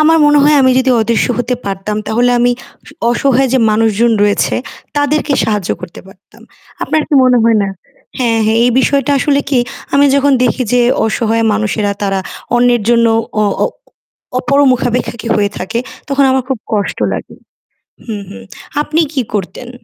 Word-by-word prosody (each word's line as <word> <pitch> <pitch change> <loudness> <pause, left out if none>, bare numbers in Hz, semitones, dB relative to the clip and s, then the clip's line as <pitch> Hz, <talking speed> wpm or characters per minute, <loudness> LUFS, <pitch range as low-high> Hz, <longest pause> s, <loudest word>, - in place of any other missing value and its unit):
আমার 320 +1 +4
মনে 295 0 +4
হয় 300 0 +4
আমি 260 - +4
যদি 260 0 +1
অদৃশ্য 225 +1 +1
হতে 245 +1 -1
পারতাম 200 +1 -4
তাহলে 240 +3 +1
আমি 245 0 +3 0.6
অসহায় 265 +2 +1
যে 260 - +3
মানুষজন 225 +1 +2
রয়েছে 205 0 +1 0.4
তাদেরকে 290 +1 0
সাহায্য 210 -4 -2
করতে - - -9
পারতাম। 195 0 -19 0.4
আপনার 310 - 0
কি - - 0
মনে 250 -1 +4
হয় 230 -1 +4
না 195 - -1 0.5
হ্যাঁ, 230 -3 +1
হ্যাঁ 220 +1 +2
এই 245 - +3
বিষয়টা 280 +1 +1
আসলে 280 +2 +1
কি 265 - +2 0.4
আমি 285 +1 +5
যখন 280 0 +3
দেখি 255 - 0
যে 250 - +4 0.2
অসহায় 225 0 0
মানুষেরা 210 -1 -1
তারা 195 -1 0 0.4
অন্যের 240 -1 +2
জন্য 235 -1 +4 0.4
অ - - +2 0.2
অ - - +2 0.7
অপরমুখাপেক্ষী 255 -4 0
হয়ে 205 -1 +1
থাকে 220 +6 -3 0.3
তখন 280 0 +2
আমার 260 0 +1
খুব 265 -3 -2
কষ্ট 205 -2 -1
লাগে। - - -6 0.7
হুম, 215 -4 -5
হুম। 95 -1 -10 0.4
আপনি 310 +2 -1
কি 270 -4 0
করতেন? 205 +5 -4
240 Hz, 160 wpm, -14 LUFS, 215-270 Hz, 0.7 s, আমি